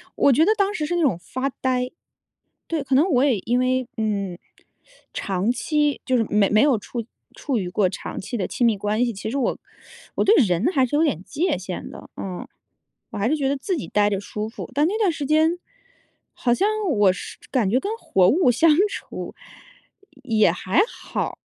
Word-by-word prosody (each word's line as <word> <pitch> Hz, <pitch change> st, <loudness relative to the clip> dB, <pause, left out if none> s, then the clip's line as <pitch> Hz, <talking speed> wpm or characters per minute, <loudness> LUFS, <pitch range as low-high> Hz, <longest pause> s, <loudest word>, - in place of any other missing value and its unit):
我 280 Hz, -, +4 dB
觉 310 Hz, +6 st, +4 dB
得 430 Hz, -, +4 dB
当 400 Hz, +1 st, +1 dB
时 305 Hz, -, -2 dB
是 350 Hz, -, -2 dB
那 345 Hz, -, +1 dB
种 255 Hz, -, +2 dB
发 260 Hz, +9 st, -3 dB
呆， 255 Hz, -1 st, 0 dB, 0.8 s
对， 315 Hz, -4 st, -2 dB
可 265 Hz, -, 0 dB
能 310 Hz, +8 st, +4 dB
我 260 Hz, 0 st, +3 dB
也 250 Hz, -8 st, +2 dB
因 245 Hz, +5 st, 0 dB
为 255 Hz, 0 st, 0 dB
嗯， 200 Hz, -5 st, -2 dB, 0.7 s
长 195 Hz, +3 st, -1 dB
期 295 Hz, +3 st, 0 dB
就 255 Hz, -1 st, +1 dB
是 225 Hz, -, +2 dB
没 205 Hz, -1 st, +2 dB
没 215 Hz, +1 st, +4 dB
有 275 Hz, -6 st, +3 dB
处 230 Hz, +2 st, -6 dB, 0.3 s
处 270 Hz, -6 st, -2 dB
于 180 Hz, -3 st, -3 dB
过 185 Hz, 0 st, +2 dB
长 -, -, -6 dB
期 225 Hz, +5 st, -5 dB
的 195 Hz, -, -1 dB
亲 245 Hz, -, -1 dB
密 220 Hz, -3 st, +3 dB
关 210 Hz, +4 st, 0 dB
系。 235 Hz, -, -1 dB
其 200 Hz, +2 st, -6 dB
实 275 Hz, -, -3 dB
我 260 Hz, -, 0 dB, 0.6 s
我 -, -, +2 dB
对 420 Hz, -, +5 dB
人 180 Hz, -, 0 dB
还 265 Hz, -3 st, +3 dB
是 255 Hz, -, -6 dB
有 315 Hz, -, +3 dB
点 185 Hz, -, 0 dB
界 330 Hz, -, -1 dB
限 185 Hz, -1 st, -6 dB
的， -, -, -11 dB
嗯， 185 Hz, -2 st, -6 dB, 0.6 s
我 -, -, -6 dB
还 205 Hz, -, +1 dB
是 305 Hz, -, +2 dB
觉 275 Hz, -3 st, 0 dB
得 280 Hz, -, 0 dB
自 360 Hz, +6 st, -2 dB
己 275 Hz, -, -5 dB
待 205 Hz, 0 st, +2 dB
着 200 Hz, -1 st, -1 dB
舒 210 Hz, +1 st, -5 dB
服。 230 Hz, -, -8 dB
但 295 Hz, +2 st, +3 dB
那 400 Hz, +6 st, -1 dB
段 405 Hz, -5 st, +3 dB
时 295 Hz, -2 st, -4 dB
间， 315 Hz, +4 st, +2 dB, 0.8 s
好 240 Hz, -, 0 dB
像 395 Hz, -, +2 dB, 0.2 s
我 205 Hz, -6 st, +4 dB
是 185 Hz, -, -8 dB
感 225 Hz, -8 st, +1 dB
觉 255 Hz, +4 st, +2 dB
跟 405 Hz, -, -3 dB
活 195 Hz, -, +3 dB
物 320 Hz, -, +4 dB
相 305 Hz, +7 st, +4 dB, 0.2 s
处 -, -, -7 dB, 0.9 s
也 215 Hz, -7 st, +3 dB
还 185 Hz, -, +1 dB
好。 -, -, -5 dB
250 Hz, 225 characters per minute, -23 LUFS, 205-295 Hz, 0.9 s, 对